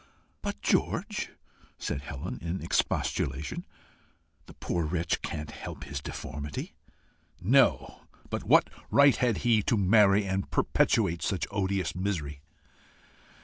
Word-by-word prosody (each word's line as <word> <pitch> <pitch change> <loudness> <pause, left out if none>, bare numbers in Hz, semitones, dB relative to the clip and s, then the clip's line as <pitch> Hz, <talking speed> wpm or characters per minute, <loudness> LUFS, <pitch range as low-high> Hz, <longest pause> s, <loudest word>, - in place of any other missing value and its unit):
"But, 70 - -5
George!" - - 0 0.5
said 70 - -3
Helen, 70 -2 -6
in 85 +3 -3
expostulation, 70 +3 -1 0.8
"the - - -13
poor 85 -1 -2
wretch 80 +1 -1
can't 75 -1 -5
help - - -8
his 70 0 -5
deformity." 70 0 -6 0.7
"No; 125 +8 +3 0.3
but - - -2
what - - +4 0.2
right 140 -1 +6
had 120 -4 +1
he 115 -3 +5
to 115 - +1
marry 100 0 +5
and 95 0 -2
perpetuate 90 -7 +2
such 95 -4 -1
odious 95 -3 -1
misery!" 80 -7 -3
90 Hz, 115 wpm, -29 LUFS, 75-100 Hz, 0.8 s, right